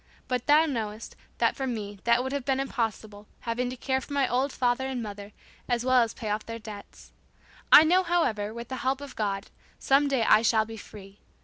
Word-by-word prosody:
But 250 Hz, -2 st, -2 dB
thou 300 Hz, +2 st, +6 dB
knowest, 225 Hz, -6 st, -4 dB, 0.2 s
that -, -, +2 dB
for 270 Hz, -, -3 dB
me, 205 Hz, -4 st, -5 dB
that 235 Hz, +1 st, +3 dB
would 265 Hz, -, -4 dB
have 280 Hz, -1 st, -2 dB
been 270 Hz, 0 st, 0 dB
impossible, 220 Hz, -5 st, -4 dB
having 245 Hz, +1 st, -2 dB
to 255 Hz, -, -6 dB
care 265 Hz, +1 st, -1 dB
for 285 Hz, -, -9 dB
my 280 Hz, -2 st, +2 dB
old 260 Hz, +3 st, 0 dB
father 250 Hz, +1 st, 0 dB
and 255 Hz, -3 st, -3 dB
mother, 205 Hz, -1 st, -8 dB, 0.4 s
as 240 Hz, 0 st, 0 dB
well 255 Hz, -1 st, +5 dB
as 230 Hz, -1 st, -1 dB
pay 215 Hz, -4 st, -4 dB
off 215 Hz, +1 st, -2 dB
their 230 Hz, 0 st, -6 dB
debts. 210 Hz, -2 st, -11 dB, 0.6 s
I -, -, +10 dB
know, 355 Hz, +4 st, +4 dB
however, 285 Hz, -, 0 dB
with 235 Hz, +1 st, -8 dB
the 260 Hz, -, -4 dB
help 265 Hz, 0 st, -1 dB
of 285 Hz, -1 st, -9 dB
God, 200 Hz, -2 st, -3 dB, 0.3 s
some 275 Hz, +2 st, +3 dB
day 270 Hz, -4 st, +1 dB
I 215 Hz, -, +5 dB
shall 220 Hz, -1 st, +3 dB
be 225 Hz, 0 st, -9 dB
free. 200 Hz, -1 st, -13 dB
240 Hz, 215 wpm, -27 LUFS, 215-265 Hz, 0.6 s, I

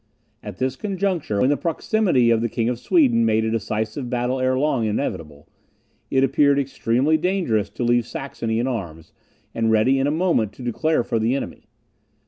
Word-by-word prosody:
At 105 Hz, -3 st, -8 dB
this 130 Hz, 0 st, -1 dB
conjuncture, 185 Hz, -, -2 dB
when 130 Hz, -, +3 dB
the 145 Hz, -, +1 dB
proximity 165 Hz, -, +1 dB
of 115 Hz, -1 st, +2 dB
the 120 Hz, -, -1 dB
King 115 Hz, +2 st, -1 dB
of 120 Hz, -1 st, -3 dB
Sweden 275 Hz, -, +3 dB
made 110 Hz, 0 st, +2 dB
a 110 Hz, -, -1 dB
decisive 110 Hz, +3 st, -3 dB
battle 125 Hz, +1 st, -1 dB
ere 130 Hz, 0 st, +1 dB
long 135 Hz, -4 st, +1 dB
inevitable, 80 Hz, -, -4 dB, 0.6 s
it 135 Hz, 0 st, +2 dB
appeared 140 Hz, +1 st, +3 dB
extremely 135 Hz, +2 st, +1 dB
dangerous 165 Hz, -, 0 dB
to -, -, -5 dB
leave 120 Hz, -1 st, +2 dB
Saxony 115 Hz, -5 st, -4 dB
in 120 Hz, -, 0 dB
arms, 85 Hz, -11 st, -5 dB, 0.4 s
and 115 Hz, -1 st, 0 dB
ready 110 Hz, +5 st, +3 dB
in 135 Hz, -, +1 dB
a -, -, +1 dB
moment 155 Hz, -, +1 dB
to 130 Hz, -, -11 dB
declare 155 Hz, +4 st, 0 dB
for 115 Hz, -1 st, -1 dB
the 115 Hz, +4 st, +1 dB
enemy. 140 Hz, -, -6 dB
125 Hz, 180 wpm, -22 LUFS, 110-140 Hz, 0.6 s, when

